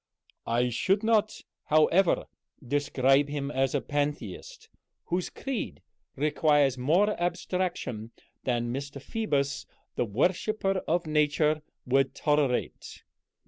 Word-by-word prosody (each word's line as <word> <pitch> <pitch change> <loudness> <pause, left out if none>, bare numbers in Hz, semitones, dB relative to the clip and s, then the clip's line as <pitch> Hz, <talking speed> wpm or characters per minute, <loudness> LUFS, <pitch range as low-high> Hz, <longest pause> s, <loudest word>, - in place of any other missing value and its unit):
"I 120 +2 +2
should 195 - +1
not, 220 -1 +2 0.2
however, 165 +4 +3 0.4
describe 140 0 +2
him 145 -1 -3
as 135 0 0
a 140 - +1
Pantheist, 145 -9 -4 0.4
whose 180 +1 -1
creed 270 -4 -5 0.3
requires 145 -2 +3
more 165 +12 +3
abstraction 175 - -2 0.3
than 120 -1 -1
Mr. 140 +1 -5
Phoebus, 140 -4 -2 0.3
the - - +1
worshiper 185 - 0
of 170 +2 +1
Nature, 150 0 +2 0.2
would 135 +1 +2
tolerate. 145 -5 -1
145 Hz, 100 wpm, -28 LUFS, 135-175 Hz, 0.4 s, however